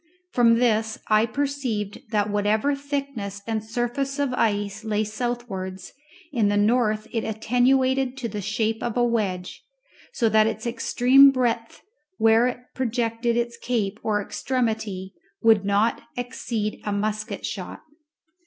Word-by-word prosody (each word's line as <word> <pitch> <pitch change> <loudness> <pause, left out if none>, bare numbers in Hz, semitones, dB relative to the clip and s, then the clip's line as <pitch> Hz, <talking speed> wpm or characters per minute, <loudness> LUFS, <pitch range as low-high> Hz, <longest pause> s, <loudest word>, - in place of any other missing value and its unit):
From 235 -2 +5
this 220 -2 +1
I 215 +1 +4
perceived 245 -6 -2
that 210 -2 +1
whatever 210 +6 +1
thickness 275 -8 -4
and 220 -1 -2
surface 245 +5 -2
of 285 -3 0
ice 205 -3 0
lay 215 -1 0
southwards, 215 -5 -4 0.4
in 230 -7 +2
the 205 0 +2
north 215 0 +2
it 225 -2 -1
was 220 - -3
attenuated 260 +3 +2
to 250 -3 -3
the 210 -1 -5
shape 220 +3 -1
of 240 0 -2
a 245 - +3
wedge, 200 -6 -1 0.5
so 240 - +1
that 215 0 +4
its 225 0 -3
extreme 250 +3 +5
breadth 240 -3 -1 0.3
where 225 +2 +5
it 245 - -3
projected 235 -1 -1
its 235 0 -1
cape 220 -4 -2
or 210 -1 0
extremity 220 -7 -2 0.3
would 220 -3 +5
not 205 +3 +2 0.2
exceed 240 -3 -3
a 210 - -2
musket 215 +1 -2
shot. - - -6
225 Hz, 140 wpm, -24 LUFS, 210-245 Hz, 0.5 s, From